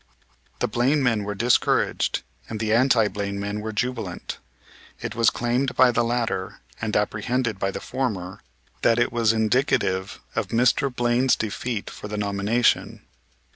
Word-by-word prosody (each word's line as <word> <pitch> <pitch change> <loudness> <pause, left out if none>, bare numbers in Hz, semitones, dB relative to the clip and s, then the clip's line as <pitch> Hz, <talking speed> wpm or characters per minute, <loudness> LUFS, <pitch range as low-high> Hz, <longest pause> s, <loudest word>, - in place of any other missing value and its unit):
The - - +2
Blaine 130 +6 +1
men 115 -5 +1
were 105 0 -3
discouraged 120 +5 +1 0.3
and 110 - -4
the 110 0 0
anti 115 -2 +4
Blaine 100 0 -4
men 100 +1 -3
were 110 +1 -4
jubilant. 110 -5 -3 0.6
It - - -4
was 115 -2 +4
claimed 125 +2 -1
by 130 -1 +6
the 120 - +1
latter, 115 -6 -2 0.2
and 110 -2 -2
apprehended 105 +1 -1
by 95 - 0
the - - -4
former, 105 -7 -3 0.4
that 115 - +4
it 120 0 +1
was 115 -2 +3
indicative 110 -4 +1 0.2
of 110 -4 0
Mr. 125 +5 +2
Blaine's 125 +1 +2
defeat 110 0 -3
for - - -8
the 105 0 -5
nomination. 105 +3 +1
115 Hz, 150 wpm, -24 LUFS, 105-125 Hz, 0.6 s, by